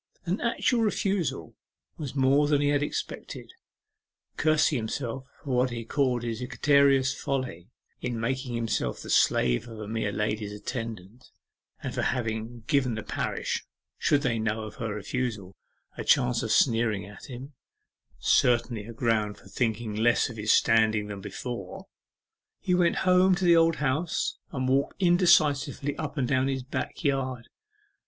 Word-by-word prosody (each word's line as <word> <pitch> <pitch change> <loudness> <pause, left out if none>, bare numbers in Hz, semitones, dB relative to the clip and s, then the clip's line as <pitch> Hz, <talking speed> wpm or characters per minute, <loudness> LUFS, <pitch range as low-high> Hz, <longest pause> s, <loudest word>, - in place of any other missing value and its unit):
An 180 +4 -1
actual 235 0 +1
refusal 190 - -1 0.4
was 145 -3 -6
more 140 +2 +4
than 145 -1 +3
he 145 0 +2
had 145 0 +2
expected. 145 - -5 0.8
Cursing 155 -1 +3
himself 120 +3 -4 0.2
for 140 - -5
what 125 +1 +3
he 115 -1 -5
called 125 -2 0
his 115 0 -3
egregious 135 0 +3
folly 125 -10 -4 0.3
in 120 -2 -3
making 125 +1 -2
himself 115 - -1
the - - -6
slave - - +3
of 115 -1 -9
a 105 - -6
mere 110 -1 -2
lady's 105 0 -2
attendant, 115 0 -7 0.5
and - - -4
for - - -1
having 115 -1 -2
given 135 -6 +1
the 110 - -5
parish, - - -2 0.4
should 145 0 +2
they 115 -4 0
know 110 0 -1
of 110 - -9
her 115 -2 -3
refusal, 105 -3 -4 0.4
a - - -5
chance 125 -3 +3
of 110 - -2
sneering 115 -5 +2
at 100 0 -12
him 130 +3 -8 0.6
certainly 120 -3 +2
a 115 - -8
ground 110 -3 0
for - - -17
thinking 115 -2 -1
less 115 +4 +2
of 115 - -11
his 105 0 +1
standing 110 -2 +3
than 100 -1 -6
before 100 0 -6 0.7
he 185 - -1
went 180 -1 +3
home 185 0 +5
to 185 +1 -1
the 170 -1 +6
Old 165 0 +4
House, 150 +4 -1
and 130 -3 -2
walked 135 +6 +1
indecisively 155 -6 +3
up 155 0 -5
and 130 -3 +1
down 130 0 +2
his 135 -1 -2
back 135 +5 -5
yard. 130 -4 -1
125 Hz, 155 wpm, -27 LUFS, 110-140 Hz, 0.8 s, the